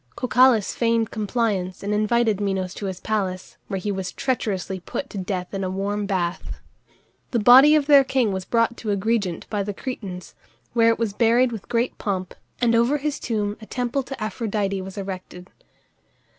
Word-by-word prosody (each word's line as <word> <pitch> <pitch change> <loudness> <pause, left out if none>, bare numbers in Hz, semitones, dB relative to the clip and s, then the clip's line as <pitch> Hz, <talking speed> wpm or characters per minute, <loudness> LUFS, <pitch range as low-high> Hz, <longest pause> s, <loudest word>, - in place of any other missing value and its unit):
Cocalus 250 -4 +3
feigned 230 -1 +1
compliance 210 -4 -1
and 205 +1 -1
invited 215 0 +2
Minos 190 -2 -1
to 200 - -5
his 185 -1 -5
palace, 190 -4 -3
where 195 - -3
he 205 +3 -2
was 190 -2 -3
treacherously 200 -7 -2
put 270 +9 -6
to 200 - -5
death 185 -1 -4
in 195 0 -2
a 185 - -1
warm 200 +2 -2
bath. 180 -3 -2 0.7
The 240 - 0
body 255 +7 +8
of 300 -2 +2
their 285 -2 +7
king 260 -5 +1
was 190 -1 -3
brought 230 +3 +1
to 220 - -5
Agrigent 200 -3 -1
by 205 -2 0
the 200 0 -4
Cretans, 195 -9 -6 0.4
where 230 -1 +4
it 230 - +2
was 225 -3 -1
buried 235 +3 +3
with 220 -4 -8
great 235 +1 -1
pomp, 185 -4 -3 0.3
and 235 -2 +3
over 235 +5 +3
his 295 0 -3
tomb 210 -3 -2
a 215 - -11
temple 250 +2 -1
to 270 +1 -8
Aphrodite 210 -3 -2
was 190 +2 -9
erected. 185 -2 -7
210 Hz, 180 wpm, -23 LUFS, 190-235 Hz, 0.7 s, body